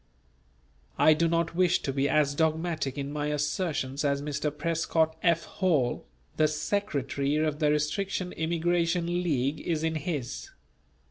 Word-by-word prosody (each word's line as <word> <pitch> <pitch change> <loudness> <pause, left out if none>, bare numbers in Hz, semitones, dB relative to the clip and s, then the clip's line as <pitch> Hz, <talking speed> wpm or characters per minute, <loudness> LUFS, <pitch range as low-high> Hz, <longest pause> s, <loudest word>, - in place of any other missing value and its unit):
I 155 - +6
do 165 +2 +2
not 170 0 0
wish 180 0 +2
to 135 - -2
be 140 +1 +1
as 150 -2 +3
dogmatic 160 -2 0
in 140 0 -4
my 150 0 -2
assertions 145 -2 -1
as 140 -1 +1
Mr. 145 +1 -2
Prescott 160 +1 0
F. 170 -1 +3
Hall, 150 - 0 0.3
the 155 - +4
Secretary 150 -4 -1
of 155 -1 0
the 150 -2 +3
Restriction 180 +5 -1
Immigration 170 +1 0 0.2
League 145 -3 0
is 160 -2 -1
in 160 0 +1
his. 145 -5 -4
155 Hz, 140 wpm, -28 LUFS, 145-170 Hz, 0.3 s, I